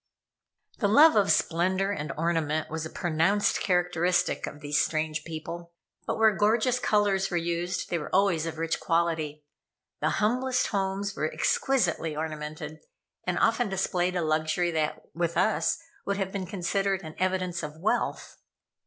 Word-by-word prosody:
The 205 - +2
love 295 +10 +7
of 200 -2 +4
splendor 185 +4 +1
and 150 -6 -3
ornament 155 -2 0
was 160 0 -3
a - - -13
pronounced 175 +6 +1
characteristic 180 -1 +1
of 145 - -8
these 145 0 +1
strange 155 -1 -1
people. 170 +1 -7 0.3
But - - -1
where 220 -2 +4
gorgeous 230 +4 +2
colors 205 -4 +2
were 175 - -1
used, 170 +1 -2
they 170 - +1
were 150 - -6
always 185 -5 +2
of 160 -1 -5
rich 165 0 -1
quality. 160 -3 -1 0.5
The - - +1
humblest 250 +4 +1
homes 195 0 -2
were 155 +2 -1
exquisitely 175 - +1
ornamented, 155 0 -5 0.5
and 180 -1 -1
often 230 0 +2
displayed 185 -1 0
a 175 - 0
luxury 155 +3 +1
that, 155 -2 -1
with 170 0 -1
us, 220 - +2 0.3
would 200 0 -1
have 195 -1 -2
been 190 -2 -4
considered 195 +1 -1
an 155 -1 -8
evidence 185 -1 0
of 150 -1 -7
wealth. 200 +6 -1
175 Hz, 155 wpm, -27 LUFS, 160-195 Hz, 0.5 s, love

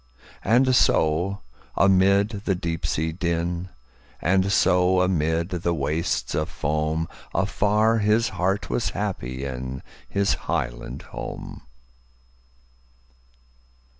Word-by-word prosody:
And 130 +3 +4
so 90 +1 +2 0.4
amid 100 +1 +4 0.2
the 95 - +1
deep 85 -2 -3
sea 80 +1 -1
din, 85 +1 -2 0.5
And 95 +2 +2
so 90 -2 +4
amid 85 -1 0
the 85 -2 -1
wastes 75 +3 -1
of 75 - -1
foam, 80 +2 -1 0.3
Afar 105 +3 +2
his 110 +2 +2
heart 95 +3 -1
was - - -1
happy 65 +2 -3
inHis 65 +9 -3
highland - - -3
home! - - -7
90 Hz, 95 wpm, -24 LUFS, 80-100 Hz, 0.5 s, And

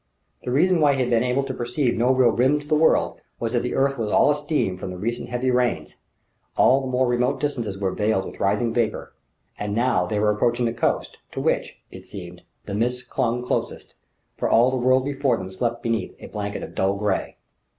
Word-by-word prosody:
The - - -4
reason 170 +5 +3
why 145 -2 +4
he 135 - 0
had 125 -1 -1
been 115 0 +3
able 125 +2 +1
to 135 -1 -4
perceive 125 +1 -1
no 120 +3 +2
real 130 -2 +4
rim 130 +5 +2
to 145 - -12
the 155 - 0
world 155 +1 +2 0.2
was 115 0 -2
that 120 - +3
the 125 - -3
earth 135 -1 +1
was 105 -2 -2
all 145 - +5
a - - +2
steam 145 - -1
from 90 - -6
the 90 - -6
recent 115 +5 -3
heavy 125 +1 0
rains; 120 -12 0 0.6
all 135 +2 +5
the 135 - -4
more 130 0 +1
remote 125 +3 +1
distances 120 -9 -2
were 95 -1 -1
veiled 105 -2 0
with - - -9
rising 105 +4 +1
vapour. 115 -3 -1 0.5
And 105 0 -3
now 115 -7 +2
they 105 +2 -1
were 105 0 +3
approaching 120 +3 +1
the 115 - 0
coast, - - -1 0.2
to - - -4
which, - - -1
it - - -11
seemed, 90 -2 -9 0.2
the 100 - -5
mists 125 +4 -1
clung 125 0 -1
closest; 125 - -3 0.4
for - - -1
all 120 +3 +5
the - - -1
world 130 +1 +3
before 135 -3 0
them 95 0 -7
slept 115 +4 -2
beneath 115 -1 -2
a - - -11
blanket 105 -1 -5
of - - -8
dull 95 +1 +1
grey. 100 -1 -2
120 Hz, 225 wpm, -23 LUFS, 105-130 Hz, 0.6 s, all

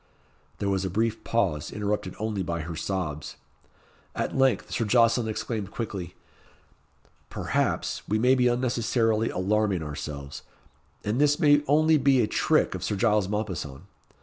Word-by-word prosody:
There 100 - -2
was 95 -1 0
a 95 - -1
brief 110 +4 -1
pause, 95 -11 0
interrupted 105 -2 -2
only 110 -2 -2
by 85 -2 -2
her 85 +1 -6
sobs. 80 -3 -4 0.8
At - - -2
length 135 -1 +2
Sir - - 0
Jocelyn 115 +1 +3
exclaimed 110 -2 -3
quickly, 95 -6 -5 1.1
"Perhaps, - - -1
we 105 - +1
may 125 +4 +4
be 125 -1 +3
unnecessarily 115 -2 +1
alarming 100 -1 0
ourselves, 70 -1 -6 0.6
and 110 +6 0
this 145 0 +4
may 145 -3 +5
only 155 +2 +4
be 140 -2 +4
a 115 - +4
trick - - +1
of - - -5
Sir 105 - -1
Giles 105 -1 +2
Mompesson. 95 -9 -4
105 Hz, 145 wpm, -26 LUFS, 95-120 Hz, 1.1 s, may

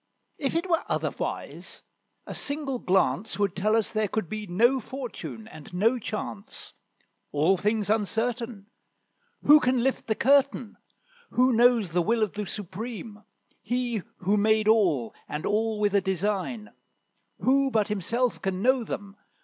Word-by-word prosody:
If 280 +1 -1
it 340 +3 0
were 335 -1 +1
otherwise, - - -4 0.4
a - - -7
single 285 -3 -3
glance 190 +2 +1
Would 200 -3 0
tell 210 +4 +2
us 225 -2 +1
there 215 -1 0
could 210 -2 -2
be 215 -1 -5
no 235 +9 +3
fortune 245 -3 -7
and 155 -7 -12
no 225 +7 +2
chance. 210 -1 -6 0.6
All 155 +6 +3
things 210 +2 0
uncertain; 225 0 -1 0.7
Who 300 +1 +8
can 255 -3 +1
lift 265 0 -1
the 220 - +1
curtain? 275 -3 +2 0.5
Who 255 +1 +3
knows 235 -5 +4
the 175 +1 +2
will 225 +5 +1
of 210 - -2
the 205 -1 -4
Supreme? 210 +3 -7 0.4
He 240 -1 -1 0.2
who 200 +3 +1
made 215 +1 +3
all, 175 - +3 0.2
and 150 - -4
all 220 +1 0
with 205 -1 +1
a 200 - +4
design; 205 +3 -2 0.7
Who 275 +1 +3
but 220 -5 +1
himself 230 +5 0
can 190 -1 -2
know 260 0 +3
them? 200 -2 -6
220 Hz, 150 wpm, -27 LUFS, 200-245 Hz, 0.7 s, Who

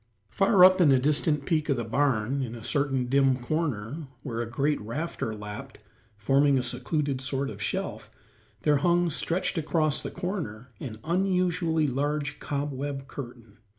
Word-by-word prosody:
Far 195 -2 +6
up 185 0 +6
in 155 -5 +6
a 135 - +6
distant 150 +2 +1
peak 155 -3 0
of 140 - +2
the 120 - -1
barn, 130 +1 +1
in 120 -3 -4
a 115 - -9
certain 135 -3 0
dim 135 0 +3
corner, 140 0 -3 0.2
where 120 -4 -3
a 115 - -4
great 145 +5 0
rafter 115 0 -4
lapped, 105 0 -8 0.4
forming 135 +5 +3
a 125 - 0
secluded 130 +2 -1
sort 135 +1 -2
of - - -9
shelf, - - -3 0.5
there 150 -1 +3
hung, 175 +3 +2
stretched 170 +3 0
across 155 -1 +1
the - - -4
corner, 160 - -5
an 110 -5 -6
unusually 175 -2 +1
large 145 +2 -1
cobweb 140 -1 -3
curtain. 120 -5 -9
140 Hz, 155 wpm, -27 LUFS, 125-160 Hz, 0.5 s, Far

